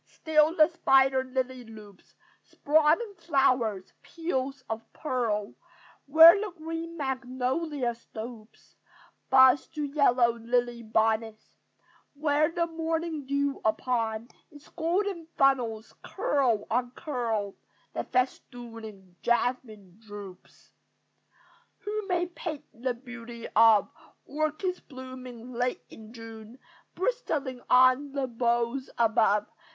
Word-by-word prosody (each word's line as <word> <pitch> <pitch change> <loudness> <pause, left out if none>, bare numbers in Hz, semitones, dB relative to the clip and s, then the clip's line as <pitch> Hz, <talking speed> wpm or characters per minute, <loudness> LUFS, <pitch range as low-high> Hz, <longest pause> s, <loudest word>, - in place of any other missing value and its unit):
Still 315 +1 +2
the 310 -2 +6
spider 270 -5 +3
lily 255 -1 -3
loops 215 -4 -15 0.3
Sprawling 315 +9 +2
flowers, 255 - +1
peels 275 -5 -4
of 225 0 -4
pearl, 230 -8 -2 0.5
Where 325 +4 +10
the 425 - -3
green 330 +1 -6
magnolia 260 0 -2
stoops 225 -1 -11 0.6
Buds 260 +1 +6
to 305 -2 -5
yellow 250 -5 +2
lily 240 0 -1
bonnets; 220 0 -1 0.6
Where, 295 +1 +2
the 340 0 0
morning 325 -2 -3
dew 280 0 -1
upon 225 0 -1 0.2
its 290 -1 -16
Golden 345 +1 -2
funnels, 240 -5 +1
curl 245 -7 0
on 245 +2 +1
curl, 230 - -2 0.4
The - - -2
festooning 225 -7 -4
jasmine 225 -6 -1
droops. 205 -4 -12 1.1
Who 420 0 -4
may 355 -1 +1
paint 335 -3 -7
the 245 +2 -3
beauty 235 -1 -9
of 220 -2 +6 0.4
Orchids 310 +5 -2
blooming 255 -2 -10
late 245 +1 -2
in 220 0 -13
June, 225 0 -11 0.4
Bristling 300 - -2
on 255 +2 +5
the 275 -2 -1
boughs 240 +1 -1
above! 220 -2 +3
255 Hz, 105 wpm, -28 LUFS, 230-300 Hz, 1.1 s, Where